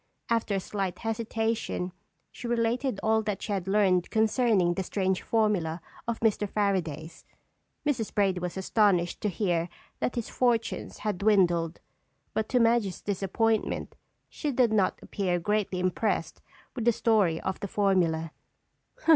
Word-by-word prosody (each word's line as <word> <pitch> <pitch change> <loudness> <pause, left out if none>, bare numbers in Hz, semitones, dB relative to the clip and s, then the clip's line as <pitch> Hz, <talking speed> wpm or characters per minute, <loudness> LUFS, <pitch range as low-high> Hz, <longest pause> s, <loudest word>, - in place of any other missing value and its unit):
After 230 -3 +1
a - - +1
slight 190 -1 -3
hesitation, 225 -4 -2 0.4
she 240 - -7
related 235 0 0
all 220 0 +3
that 210 -3 -2
she - - -4
had 190 -2 -2
learned 190 -3 +3
concerning 220 -5 +3
the 190 - -2
strange 190 0 -1
formula 200 -8 +1 0.3
of 235 -1 -1
Mr. 210 -2 +1
Fairaday's. 170 -6 -2 0.6
Mrs. 255 -7 0
Brady 195 -3 +1
was 180 +1 -4
astonished 190 -3 +2
to 210 - +1
hear 175 -3 0 0.3
that - - -1
his 235 -3 -2
fortunes 235 -3 0
had 205 -4 -1
dwindled, 175 -5 +2 0.5
but 220 - -1
to 250 - +3
Madge's 230 -5 +2
disappointment 205 +3 0 0.3
she 295 - -3
did 240 -4 +3
not 200 -3 +2
appear 180 -3 -1
greatly 205 0 0
impressed 185 +4 -1 0.3
with 235 -3 -3
the 240 - +6
story 205 -8 +2
of 190 - -3
the 200 - -4
formula. 175 -6 +1
205 Hz, 140 wpm, -28 LUFS, 180-225 Hz, 0.6 s, the